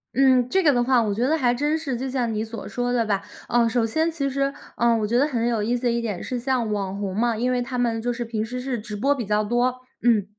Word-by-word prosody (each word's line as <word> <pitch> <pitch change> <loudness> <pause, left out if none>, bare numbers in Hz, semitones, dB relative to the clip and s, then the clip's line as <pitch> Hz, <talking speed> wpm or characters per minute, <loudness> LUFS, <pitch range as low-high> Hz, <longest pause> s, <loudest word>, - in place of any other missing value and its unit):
嗯， 255 -2 +4
这 385 +4 +2
个 295 -3 +5
的 245 0 +2
话 250 -2 +3
我 205 -2 0
觉 230 +4 -1
得 320 +2 +2
还 245 -4 +2
真 295 +5 0
是， 280 -6 -3
就 260 +2 -3
像 245 -4 -1
你 215 +1 -1
所 225 -1 -7
说 245 0 -2
的 235 -2 +1
吧， 200 -2 0 0.3
呃， 235 -1 +3
首 235 -1 +1
先 315 +8 +1
其 295 -4 -2
实， 275 +1 0 0.2
呃， 235 -1 +3
我 215 - 0
觉 230 +3 -1
得 290 - +3
很 240 -4 -1
有 230 -3 0
意 235 +4 0
思 245 - -10
的 240 - +2
一 235 0 0
点 210 -6 -4
是 250 -1 -3
像 245 -4 0
网 195 -1 -3
红 195 -2 -3
嘛， 230 0 +1
因 250 +2 0
为 250 -1 +1
他 250 0 -4
们 230 -2 0
就 245 +1 -1
是 240 0 -4
平 220 -1 -2
时 250 +3 -5
是 250 -2 -3
直 210 -1 -7
播 275 +7 +2
比 245 -6 -4
较 210 +1 +1
多， 245 +3 0 0.2
嗯。 225 -5 +3
240 Hz, 310 characters per minute, -24 LUFS, 225-255 Hz, 0.3 s, 个